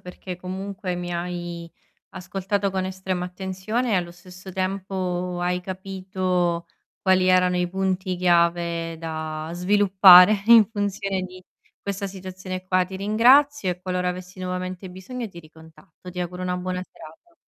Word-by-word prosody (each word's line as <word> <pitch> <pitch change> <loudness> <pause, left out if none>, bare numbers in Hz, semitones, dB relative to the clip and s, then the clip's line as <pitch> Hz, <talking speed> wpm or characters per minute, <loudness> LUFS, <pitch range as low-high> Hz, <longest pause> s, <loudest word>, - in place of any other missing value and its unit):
perché 180 0 -8
comunque 185 +1 -5
mi 175 0 -4
hai 175 -1 -5 0.4
ascoltato 195 +2 -2
con 190 -1 -2
estrema 185 -1 -3
attenzione 190 +6 -3
e - - +3
allo 175 -1 -2
stesso 180 +2 -12
tempo 185 -1 -2
hai 180 0 0
capito 185 -2 -2 0.3
quali 185 -1 +3
erano 180 0 +4
i 180 0 0
punti 190 0 -1
chiave 170 -2 +1
da 155 -1 -5
sviluppare 190 +1 +7
in 230 -2 +8
funzione 200 -2 -2
di 185 0 -9 0.4
questa 200 0 -4
situazione 185 -1 -7
qua. 185 0 +2
Ti 190 +1 -8
ringrazio 240 +4 +4
e 180 - -5
qualora 180 -1 -1
avessi 180 +1 -7
nuovamente 185 0 -4
bisogno 220 +6 -7
ti 175 - -13
ricontatto. 160 +3 -15
Ti 180 0 -5
auguro 180 +1 -4
una 180 0 -1
buona 180 0 -3
serata. 185 - -15
185 Hz, 140 wpm, -24 LUFS, 180-190 Hz, 0.4 s, in